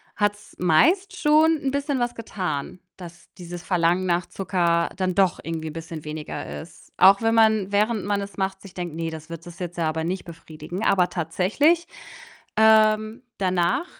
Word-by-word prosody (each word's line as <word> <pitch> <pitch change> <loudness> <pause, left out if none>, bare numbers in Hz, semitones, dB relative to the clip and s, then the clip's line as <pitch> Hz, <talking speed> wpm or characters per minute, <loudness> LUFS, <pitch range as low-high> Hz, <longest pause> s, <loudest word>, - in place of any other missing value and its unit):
hat's 205 0 -2
meist 340 - +3
schon 310 +2 +4
'n 275 - -1
bisschen 280 -1 -1
was 240 0 -1
getan, 180 -7 -4 0.2
dass 175 -2 -12
dieses 175 0 -8
Verlangen 175 0 +1
nach 175 0 +1
Zucker 170 -3 0
dann 185 -1 0
doch 190 -2 +2
irgendwie 160 -1 -4
'n 150 - -9
bisschen 165 -1 -7
weniger 150 0 -6
ist, 165 - -16
auch 195 +3 +6
wenn 225 0 +2
man, 220 -3 +3
während 210 0 +1
man 200 -1 0
es 200 -2 -8
macht, 190 0 -2
sich 195 -2 -13
denkt: 175 -3 -5
„Ne, 165 0 -3
das 160 +1 -9
wird 165 0 -8
es 175 0 -11
jetzt 175 0 -6
ja 165 -2 0
aber 160 0 -2
nicht 180 +3 -3
befriedigen.“ 165 +3 -8
Aber 180 -2 +3
tatsächlich, 220 - +1 0.7
ähm, 220 +1 +4 0.2
danach 185 - +1
185 Hz, 175 wpm, -24 LUFS, 170-215 Hz, 0.7 s, auch